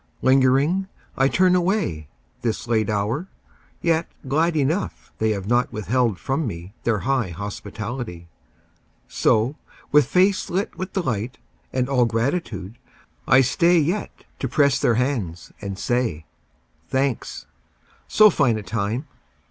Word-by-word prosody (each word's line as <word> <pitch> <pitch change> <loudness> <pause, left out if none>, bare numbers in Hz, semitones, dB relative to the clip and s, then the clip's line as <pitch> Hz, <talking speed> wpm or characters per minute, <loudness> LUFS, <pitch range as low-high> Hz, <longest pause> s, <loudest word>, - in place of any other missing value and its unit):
Lingeringly 135 +8 +3 0.3
I 135 - +3
turn 180 +5 +3
away, 175 - 0 0.3
This 115 0 -2
late 110 -3 +1
hour, 110 - -1 0.6
yet 165 -1 +2 0.2
glad 160 +4 +2
enough 155 +7 -1
They 110 - +2
have 100 -3 -2
not 120 +3 +1
withheld 115 0 0
from 135 - -1
me 90 -1 -7
Their 110 -4 +1
high 130 -5 +1
hospitality. 100 0 -6 0.8
So, 120 +7 +1 0.3
with 150 -3 +5
face 190 +2 +2
lit 190 +3 -2
with 185 0 -5
delight 125 - -2 0.3
And 125 -1 0
all 130 -3 +3
gratitude, 115 - -2 0.5
I 130 +3 +7
stay 170 +7 +3
Yet 170 +7 0 0.3
to 130 - -1
press 140 +1 +3
their 120 - +3
hands 115 -9 -2
and 100 -2 -5
say, 115 -10 -1 0.6
"Thanks. 130 -2 -1 0.6
So 215 -1 +6
fine 130 -9 +2
a 105 - -5
time 110 - -2
125 Hz, 130 wpm, -23 LUFS, 110-150 Hz, 0.8 s, I